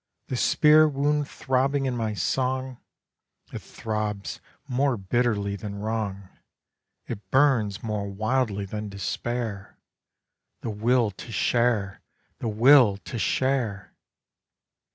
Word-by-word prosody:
The 130 - -2
spear 155 +4 +5
wound 145 +1 0
throbbing 135 +1 0
in 130 -2 -1
my 110 -3 -2
song, 130 +6 -1 0.7
It - - -4
throbs 105 -2 -4 0.3
more 130 0 +1
bitterly 100 0 0
than 100 +1 -6
wrong, 100 -2 -3 0.8
It 110 -3 -7
burns 125 -8 +2
more 105 -3 -3
wildly 110 0 -1
than 105 +1 -5
despair, 100 +2 -4 0.8
The 115 - -3
will 115 +1 +2
to 115 +4 -10
share, 115 -5 +1 0.4
The 115 - -2
will 115 -1 +6
to 115 +3 -7
share! 120 -6 -1
115 Hz, 110 wpm, -26 LUFS, 100-130 Hz, 0.8 s, will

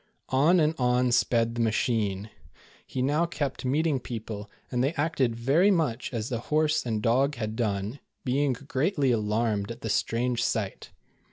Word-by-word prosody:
On 150 +7 +4
and 155 0 +3
on 125 0 +2
sped 115 -1 +2
the 120 - -2
machine. 110 -2 0 0.6
He 130 - -2
now 150 +5 +2
kept 145 -6 -3
meeting 145 +2 +1
people, 110 -4 -6 0.2
and 125 -1 +1
they 140 +4 +1
acted 140 -6 0
very 140 - +3
much 155 - 0
as 115 -2 -3
the 120 -3 -2
horse 155 -3 +2
and 110 -2 -1
dog 135 +5 +2
had 110 -2 -4
done, 105 +2 -2 0.3
being 135 +1 +2
greatly 140 - 0
alarmed 105 -2 0
at 115 +1 -7
the 110 - -2
strange 120 +3 0
sight. - - -2
125 Hz, 160 wpm, -27 LUFS, 115-145 Hz, 0.6 s, On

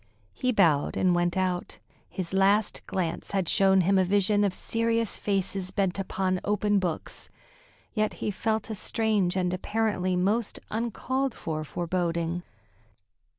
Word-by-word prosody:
He 255 -1 0
bowed 165 - +3
and 185 -1 +3
went 175 +1 +1
out. 185 -1 -1 0.3
His 185 -1 -5
last 195 +2 +2
glance 175 +1 -3
had 190 -3 0
shown 190 +1 +4
him 190 +2 +3
a - - +4
vision 205 +2 +2
of 200 - +2
serious 230 +3 0
faces 195 -2 -1
bent 195 0 -1
upon 185 -1 -1
open 205 0 +1
books; 175 -4 -4 0.6
yet 215 -1 0
he 210 - -2
felt 220 +2 -1
a - - -1
strange 210 -3 0
and 180 -1 0
apparently 185 -1 0
most 205 +5 0
uncalled 245 +4 -1
for 155 -1 -4
foreboding. 170 +1 -2
195 Hz, 140 wpm, -27 LUFS, 180-215 Hz, 0.6 s, shown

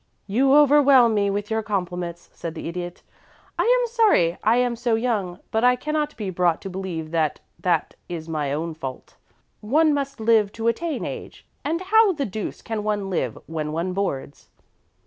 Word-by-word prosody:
"You 265 +7 +3
overwhelm 280 -5 +6
me 200 -1 +2
with 205 +2 -3
your 220 0 +1
compliments," 180 -4 -4
said 165 -1 -6
the - - -6
Idiot. 175 +1 -6 0.6
"I - - +3
am - - +3
sorry 430 - +3
I 220 +2 +4
am 245 -1 +1
so 235 -1 0
young, 215 -7 -1
but 220 +1 +1
I 250 0 +5
cannot 300 +3 -2
be 205 -4 -3
brought 175 -2 +1
to 195 - -5
believe 180 -4 -5
that 160 -3 0 0.2
that 170 -4 0 0.2
is 165 -2 -5
my 150 -4 -2
own 160 +3 -2
fault. 135 -4 -8 0.4
One 300 +8 +3
must 275 -2 -3
live 220 -2 +3
to 225 0 -3
attain 290 +5 -1
age, - - -8 0.2
and 330 +4 -1
how 420 +1 +4
the 285 -4 -2
deuce 210 -1 -5
can 220 -2 -3
one 205 -2 -1
live 130 -10 -1
when 155 -2 -4
one 170 +3 -2
boards?" 150 -8 -4
210 Hz, 180 wpm, -23 LUFS, 175-265 Hz, 0.6 s, overwhelm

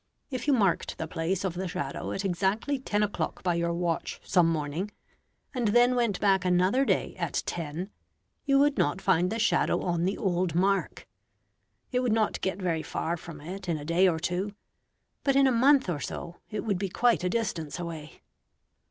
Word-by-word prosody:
If 255 0 -4
you 290 - +5
marked 200 -8 +1
the 160 - -3
place 170 +3 -2
of 185 - -1
the 185 +2 -3
shadow 140 -5 -4
at 195 - -3
exactly 195 +9 0
ten 210 -5 0
o'clock 205 - -3
by 180 -2 +2
your 170 0 0
watch 170 -1 -2
some 175 -2 +3
morning, 160 +4 -2 0.6
and 245 -4 0
then 240 +4 +5
went 235 -6 +1
back 195 -2 +3
another 185 +9 +3
day - - 0
at - - -2
ten, 170 +4 -4 0.5
you 275 -1 +3
would 285 +1 +3
not 145 - +1
find 175 +2 +2
the 225 - -1
shadow 230 +1 +2
on 175 -1 0
the 195 - 0
old 180 -3 0
mark. 195 +2 0 0.8
It 250 - +1
would 250 -3 +1
not 220 -1 +1
get 190 0 -2
very 170 -4 0
far 165 +1 -2
from 165 -3 -10
it 185 +4 -7
in 165 - +1
a 145 - -8
day 170 +4 +4
or 170 -3 +2
two, 180 +4 -2 0.7
but 275 -1 +2
in 275 0 +6
a 265 - +4
month 265 +2 +4
or 170 -5 -1
so 170 +4 -6
it 215 - -3
would 200 -5 -1
be 195 -1 -2
quite 240 0 +2
a 180 - +1
distance 180 -8 -2
away. 165 -3 -7
185 Hz, 195 wpm, -28 LUFS, 170-220 Hz, 0.8 s, in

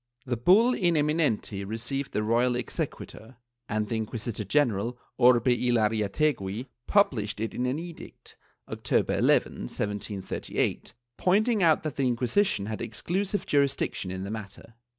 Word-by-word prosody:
The 125 -2 -1
bull 195 - +5
In 175 -7 +1
eminenti 150 -10 0
received 120 +7 -4
the 105 - -1
royal 120 +3 +2
exequatur 120 0 -5 0.3
and 110 -1 -1
the 115 - -2
Inquisitor 110 0 -4
general 120 -1 +1 0.2
Orbe 120 -2 +5
y 125 -1 +2
Larreategui 110 0 0 0.2
published 110 - +2
it 110 +1 -3
in 125 - -1
an 130 +3 -1
edict, 170 0 -10 0.3
October - - 0
11, - - +3 0.2
1738, 105 0 -3 0.2
pointing 210 +4 +2
out 160 -3 +4
that 155 -4 -4
the 135 -2 +2
Inquisition 125 - +1
had 110 +1 -4
exclusive 185 - -2
jurisdiction 140 -9 0
in 95 +1 -4
the 100 - -5
matter. 110 +1 -8
120 Hz, 135 wpm, -27 LUFS, 105-150 Hz, 0.3 s, bull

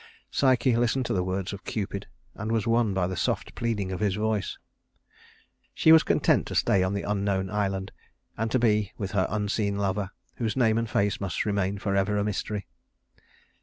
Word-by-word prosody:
Psyche 130 -2 +3
listened 120 +2 +1
to - - -1
the 90 - +1
words 95 +1 -2
of 100 - -8
Cupid, 100 -2 -4 0.3
and 110 +1 -4
was 110 -2 +1
won 115 -2 +2
by 95 -2 +1
the 95 +1 -3
soft - - -1
pleading 110 -5 -2
of 95 - -3
his 100 -3 +1
voice. 105 -1 -1 1.2
She 160 - +5
was 160 0 +9
content - - +2
to - - -5
stay 100 - +3
on 95 +2 0
the 100 - -2
unknown 100 -2 -1
island, 95 -2 -1 0.4
and 115 +1 -1
to 130 - +2
be 105 -4 +2
with 100 -3 -4
her 95 -3 +1
unseen 105 0 -1
lover, 100 0 -1 0.3
whose 115 0 -2
name 115 -3 +3
and 115 -1 -2
face 100 -1 0
must 95 -2 -2
remain 100 -1 0
forever 100 +1 0
a 100 - +1
mystery. 105 0 -3
105 Hz, 185 wpm, -27 LUFS, 95-110 Hz, 1.2 s, was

